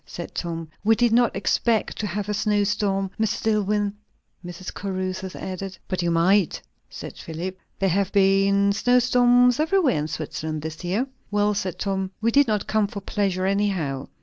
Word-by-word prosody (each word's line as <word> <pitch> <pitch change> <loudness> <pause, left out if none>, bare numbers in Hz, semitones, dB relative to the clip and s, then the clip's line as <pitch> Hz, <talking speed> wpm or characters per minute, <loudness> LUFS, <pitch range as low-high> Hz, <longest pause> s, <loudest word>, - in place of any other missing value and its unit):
said 175 - -8
Tom. 165 -2 -4 0.2
"We 225 +2 +4
did 240 0 +2
not 240 0 +3
expect 230 -2 +1
to 210 - -1
have 205 +2 -3
a 210 - -1
snow 210 0 +1
storm, 195 -2 0
Mr. 220 0 0
Dillwyn," 210 -1 +1 0.5
Mrs. 175 +1 -7
Caruthers 185 -1 -4
added. 190 0 -6
"But 185 -2 -2
you 175 - 0
might," 175 +3 +3 0.3
said - - -9
Philip. 180 +4 -6 0.2
"There 195 - +1
have 195 +2 +1
been 200 0 +3
snow 245 +4 +3
storms 245 0 +4
everywhere 315 - +2
in 150 - -2
Switzerland 155 0 -4
this 160 +2 -6
year." 195 +8 0 0.2
"Well," 210 0 +2
said 190 -3 -3
Tom, 190 -2 -2
"we 230 +1 +1
did 285 +2 +4
not 210 -2 0
come 215 -1 +1
for 200 - -6
pleasure, 195 -2 -1
anyhow. 190 -9 -1
200 Hz, 175 wpm, -24 LUFS, 185-215 Hz, 0.5 s, We